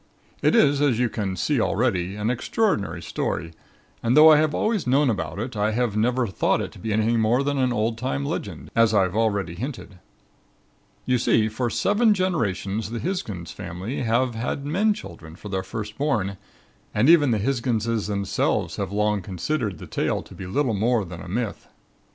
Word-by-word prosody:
"It - - +3
is, 145 -10 +4
as 140 -6 +3
you 125 0 +1
can 100 -4 -3
see 130 - 0
already, 95 -5 0
an 105 +3 -1
extraordinary 125 - -1
story 80 0 -3 0.5
and 120 +4 +2
though 155 +1 +9
I 155 - +7
have 155 0 +1
always 215 - 0
known 135 +1 +3
about 80 -4 -4
it, 115 +3 -4
I 105 +1 0
have 120 -2 0
never 120 +3 +1
thought 95 - 0
it - - -4
to - - -14
be 110 - -4
anything 110 +2 +2
more 115 +5 +2
than 140 0 -1
an 130 -1 +2
old 115 0 -1
time 70 - -2
legend, - - -5
as 115 -1 +4
I 100 - +5
have 95 +1 -2
already 100 -6 0
hinted. 110 -2 -7 1.1
You 125 -1 +2
see, 110 -2 +3
for 120 +3 -2
seven 210 - +3
generations 110 - -1
the 120 - -4
Hisgins 110 - -4
family 95 +12 -5
have 120 +1 +1
had 125 +5 -3
men 200 +8 +2
children 80 - -10
for 105 - -10
their 95 -1 -1
first 105 +3 -7
born 110 -10 0 0.6
and 110 +5 +3
even 155 -4 +6
the 115 - +2
Hisginses 115 -2 -1
themselves 100 -2 -1
have - - -3
long 105 0 +1
considered 100 - -3
the - - -9
tale - - -1
to - - -14
be 95 - -8
little 125 +5 0
more 110 +1 +1
than 85 -1 -9
a - - -9
myth. 110 +4 -3
115 Hz, 190 wpm, -24 LUFS, 100-130 Hz, 1.1 s, though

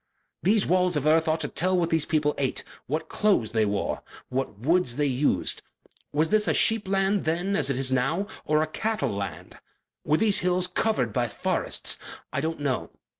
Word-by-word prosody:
These 205 +2 +3
walls 180 -1 +2
of 145 -1 -1
earth 160 +2 +4
ought 160 0 +1
to - - -1
tell 185 +2 +1
what 170 -1 0
these 160 -2 +1
people 150 -2 +1
ate, 135 -2 -1 0.2
what 155 +4 -2
clothes 200 - +1
they 110 -2 +2
wore, 100 -1 -2 0.3
what 130 -5 -3
woods 150 - +1
they 145 +1 +1
used. 140 +1 0 0.5
Was 155 +2 +1
this 215 -1 +2
a - - +2
sheep 220 -3 +2
land 195 +1 +1
then 175 +5 0
as 145 -7 +2
it 135 - 0
is 130 -1 0
now, 135 +10 +1 0.2
or 155 +1 +2
a - - 0
cattle 215 - -2
land? 100 0 -6 0.4
Were 150 +1 +2
these 210 0 +4
hills 180 0 +2
covered 180 - 0
by 120 -1 +1
forests? 105 - -1 0.3
I 140 - 0
don't 160 +1 -3
know. 140 -3 -1
155 Hz, 190 wpm, -26 LUFS, 135-185 Hz, 0.5 s, earth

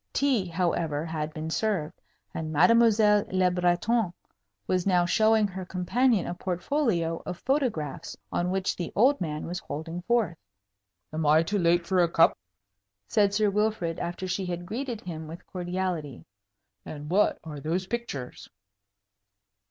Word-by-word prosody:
Tea, 260 -9 +1
however, 165 -3 -1
had 155 -1 -3
been 160 0 -5
served, 190 -6 -1 0.3
and 155 -1 -4
Mademoiselle 210 +4 +5
Le 185 -1 +3
Breton 180 +4 +1 0.5
was 185 0 0
now 180 -2 +4
showing 215 +3 +3
her 190 -1 -6
companion 190 +4 +1
a - - -3
portfolio 180 - -1
of 180 - -5
photographs, 240 - -2
on 175 +1 0
which 190 0 -1
the 175 - -4
old 260 +4 +4
man 155 -3 -3
was 175 +2 -4
holding 165 +2 -6
forth. 210 -5 +1 0.8
"Am 160 +1 -1
I 155 +2 +5
too 205 +5 -1
late 170 0 +3
for 185 +1 +1
a 170 - +3
cup?" 165 0 +4 0.7
said 205 -2 +3
Sir 205 0 +2
Wilfrid, 210 -5 0
after 175 +2 -4
she 185 +1 -2
had 175 0 -4
greeted 240 +2 -4
him 160 -3 -7
with 165 +2 -10
cordiality. 175 -6 -4 0.6
"And 150 -1 -8
what 205 +3 +3
are 150 -3 -7
those 170 +6 -2
pictures?" 190 - -5
180 Hz, 145 wpm, -27 LUFS, 165-210 Hz, 0.8 s, Mademoiselle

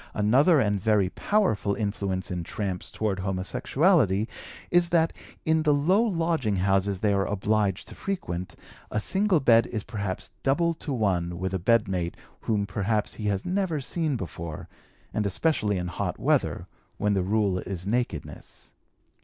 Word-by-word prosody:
Another 135 - +4
and 105 -5 +1
very 105 -3 +3
powerful 150 - +1
influence 100 -3 -2
in 90 -1 -2
'tramps' 95 0 -4
toward 105 -3 -2
homosexuality 100 - +2 0.5
is 175 -1 +4
that, 165 -1 +3 0.3
in 160 0 +3
the 150 -2 +3
low 180 +9 +3
lodging 165 - 0
houses 95 0 +1
they 105 -2 +3
are 100 -1 +1
obliged 105 -1 0
to - - -9
frequent, 90 - -4 0.3
a 110 - -1
single 190 - +2
bed 115 -4 +5
is 110 -3 -4
perhaps 100 -5 -5
double 170 +5 +2
to 160 -2 -6
one 90 -8 0
with 95 +1 -3
a 95 - 0
bedmate 95 -4 +1 0.2
whom 105 -3 0
perhaps 105 +1 -1
he 110 - -6
has 100 -2 0
never 185 -4 0
seen 155 +1 -1
before, 85 -6 -6 0.5
and 105 -1 0
especially 105 - +1
in 90 - -2
hot 85 - -3
weather, - - +1 0.3
when 105 0 +1
the 95 - +2
rule 100 -1 +1
is 90 -1 -5
nakedness. 115 -7 -4
105 Hz, 155 wpm, -26 LUFS, 95-145 Hz, 0.5 s, bed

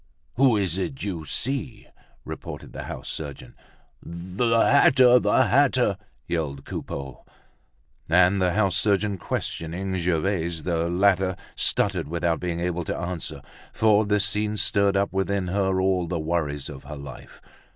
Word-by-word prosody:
"Who 125 -3 +4
is 95 -2 0
it 130 +8 -4
you 90 -6 -4
see?" 120 - -3 0.4
repeated - - -8
the - - -6
house - - -7
surgeon. 70 -5 -6 0.5
"The 95 +7 -1
hatter! 130 -2 +6
The - - +3
hatter!" - - +3 0.3
yelled 75 -5 -3
Coupeau. 70 -2 -6 0.9
And 90 +3 +4
the 90 -1 +2
house 100 -2 +2
surgeon 100 -1 +1
questioning 90 +5 -3
Gervaise, 85 -1 -1
the 85 -1 0
latter 95 0 +2 0.2
stuttered 95 -5 0
without 85 0 -1
being 85 -2 -3
able 90 0 -2
to - - -3
answer, 90 -1 -5 0.3
for 110 -1 +3
this 105 -1 +2
scene 105 +1 0
stirred 100 -1 +2
up 100 0 0
within 95 -1 -1
her 95 0 +1
all 95 -2 +1
the 85 -1 -2
worries 75 -3 -2
of 70 -2 -10
her 75 +2 -7
life. 70 -2 -11
90 Hz, 140 wpm, -25 LUFS, 85-100 Hz, 0.9 s, hatter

